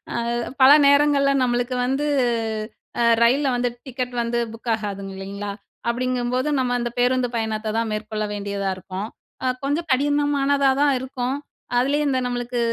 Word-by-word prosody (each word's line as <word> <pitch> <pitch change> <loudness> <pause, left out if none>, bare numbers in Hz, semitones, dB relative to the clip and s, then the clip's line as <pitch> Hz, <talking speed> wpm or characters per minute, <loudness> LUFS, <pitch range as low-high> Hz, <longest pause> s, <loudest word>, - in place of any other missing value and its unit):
அது 235 0 -1 0.3
பல 260 - +9
நேரங்கள்ல 285 0 +4
நம்மளுக்கு 245 0 0
வந்து, 270 +4 0 0.9
அ 235 - +3 0.2
ரயில்ல 270 +4 +3
வந்து 245 0 0 0.2
டிக்கெட் 255 -1 -4
வந்து 235 0 -1
புக் 230 +1 -7
ஆகாதுங்க 200 -3 -4
இல்லங்களா? 200 +1 -5 0.4
அப்டிங்கும்போது 250 +2 -1
நம்ம 250 -1 0
அந்த 240 - -2
பேருந்து 250 0 +2
பயணத்த 220 -1 -2
தான் 230 -1 0
மேற்கொள்ள 215 0 -3
வேண்டியதா 200 -1 -3
இருக்கும், 190 +2 -6 0.4
ஆ - - -1 0.2
கொஞ்சம் 295 +5 -1
கடினமானதா 285 0 +2
தான் 290 -1 +4
இருக்கும். 260 0 -3 0.4
அதுலயும் 285 +4 +2
இந்த 260 - +1
நம்மளுக்கு 245 0 -2
245 Hz, 140 wpm, -22 LUFS, 220-275 Hz, 0.9 s, பல